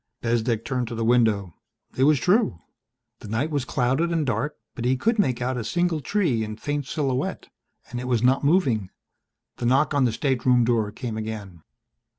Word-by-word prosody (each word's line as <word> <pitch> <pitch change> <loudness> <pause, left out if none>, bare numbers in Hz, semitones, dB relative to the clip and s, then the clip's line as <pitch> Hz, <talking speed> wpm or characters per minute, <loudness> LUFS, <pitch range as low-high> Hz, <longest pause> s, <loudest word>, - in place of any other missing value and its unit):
Bezdek 115 -1 0
turned 125 -3 -1
to 120 - -5
the 115 0 -1
window. 110 -7 +2 0.4
It 130 - +3
was 150 -2 +4
true. 180 - +2 0.6
The - - -10
night 120 +9 -1
was 145 -4 -1
clouded 135 +8 +1
and 165 -3 0
dark 130 +4 -2 0.2
but 115 - -6
he 130 +2 +2
could 225 - +1
make 130 -9 +1
out 130 +1 -1
a - - -3
single 175 +6 0
tree 155 - 0
in 110 0 -5
faint 145 +4 -3
silhouette 135 -4 -2 0.4
and 120 - -4
it 125 - -5
was 120 -2 +1
not 130 +3 +3
moving. 135 - +2 0.7
The 120 - -1
knock 135 +5 +3
on 140 -2 +3
the 120 - +2
stateroom 125 -2 +2
door 115 -3 +1
came 115 -1 -5
again. 105 -6 -6
125 Hz, 185 wpm, -24 LUFS, 115-145 Hz, 0.7 s, was